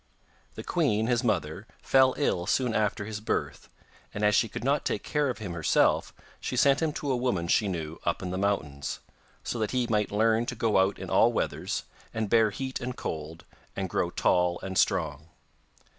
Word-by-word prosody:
The - - -6
queen, 110 +1 +1
his 120 +1 +1
mother, 95 -2 -1
fell 130 -1 +4
ill 90 -11 0
soon 125 +1 +1
after 105 -1 0
his 105 0 -5
birth, 110 - -3 0.5
and 105 - -3
as 105 - +4
she 110 +2 +3
could - - -6
not 140 +3 +1
take - - -2
care 150 -2 0
of 125 - -3
him 100 -6 -6
herself 85 -3 +2 0.3
she - - -4
sent 140 +1 +4
him 160 -1 +1
to 145 -2 -2
a - - +2
woman 120 -9 -1
she 105 +4 +3
knew 80 -4 -4
up 85 +2 -1
in 90 - -3
the 95 - -2
mountains, 80 -9 -1 0.5
so 120 - -3
that 110 -2 0
he 125 -1 0
might 105 -3 0
learn 110 +2 +2
to - - -3
go 110 -4 +2
out 95 +1 +2
in - - -7
all - - +5
weathers, - - -2 0.3
and 110 -2 -2
bear 115 -2 +5
heat 130 +5 -5
and 125 0 -4
cold, 80 +1 -6 0.3
and 95 -3 -3
grow 85 - 0
tall 90 0 +1
and 95 0 -5
strong. 75 - 0
105 Hz, 200 wpm, -28 LUFS, 90-120 Hz, 0.5 s, all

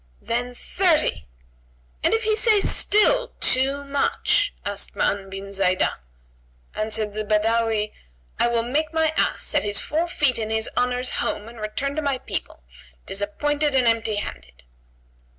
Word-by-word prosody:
"Then 245 +1 -2
thirty!" 310 - +1 0.7
"And - - +2
if 450 - -1
he 435 0 +2
say 430 -1 +4
still, 485 +6 +2
too 270 +2 +3
much?" 285 +8 +1
asked 200 0 -3
Ma'an 195 -1 0
bin 195 +1 -7
Zaidah. 185 -1 +1 0.7
Answered 215 -1 -2
the 215 +1 -3
Badawi, 215 0 +1 0.5
"I - - +4
will 235 -1 +1
make 300 +6 -1
my 320 -1 +2
ass - - +1
set - - +1
his 205 -1 +1
four 325 +3 0
feet 285 -8 +1
in 220 -1 -3
his 220 0 0
Honour's 250 0 0
home[FN#138] 210 +2 -2
and 230 -2 -11
return 260 +7 -3
to - - +1
my 280 -3 0
people, - - -5 0.4
disappointed 290 +9 -1
and 255 -2 +4
empty 225 -2 +2
handed." 60 - -7
235 Hz, 150 wpm, -23 LUFS, 210-295 Hz, 0.7 s, say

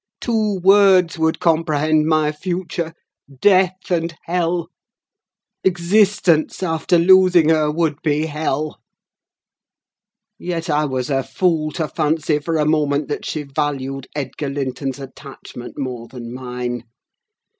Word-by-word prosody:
Two 215 -4 0
words 190 -4 +5
would 160 0 +1
comprehend 155 -2 +2
my 155 -1 +2
future—death 180 +2 -1
and 170 -1 -1
hell: 170 -1 -1 0.9
existence, 190 -2 +2
after 165 0 +1
losing 180 -2 +5
her, 155 -2 +3
would 155 -1 -1
be 150 0 0
hell. 155 -1 -3 1.6
Yet 170 -1 -3
I 150 +1 +2
was 130 -1 -3
a 135 -1 +2
fool 160 0 0
to 160 -3 -2
fancy 155 0 0
for 160 +2 -2
a 150 - +1
moment 150 -1 +1
that 145 - -4
she 155 - -3
valued 135 -2 -3
Edgar 140 0 -4
Linton's 135 -1 -3
attachment 135 -2 -10
more 125 -4 -5
than 120 -1 -9
mine. 125 -1 -5
155 Hz, 115 wpm, -20 LUFS, 140-175 Hz, 1.6 s, words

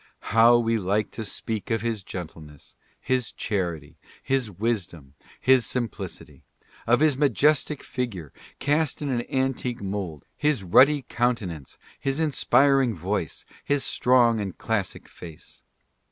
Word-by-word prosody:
How 115 +1 +7
we 115 -1 +1
like 100 +2 0
to 110 - -5
speak 110 +1 -5
of 115 -2 0
his 115 -3 -2
gentleness, 80 -6 -9 0.2
his 125 -2 -1
charity, 85 -8 -3 0.2
his 130 -4 0
wisdom, 95 - -3 0.3
his 130 -1 +4
simplicity! 120 -4 -5 0.2
— - - -27
of 120 +4 +4
his 155 -3 +4
majestic 145 +2 +2
figure, 100 - -5 0.2
cast 150 0 0
in 145 - -2
an 120 -3 0
an 130 +2 0
tique 120 -3 -5
mould, 95 -7 -4
his 150 -8 0
ruddy 135 +10 +5
countenance, 105 - -2 0.2
his 135 +2 -1
inspiring 135 -5 +3
voice, 90 -1 -3 0.2
his 145 -1 0
strong 120 -2 +3
and 100 -3 -5
classic 110 -5 -3
face 80 -3 -12
115 Hz, 135 wpm, -25 LUFS, 95-130 Hz, 0.3 s, How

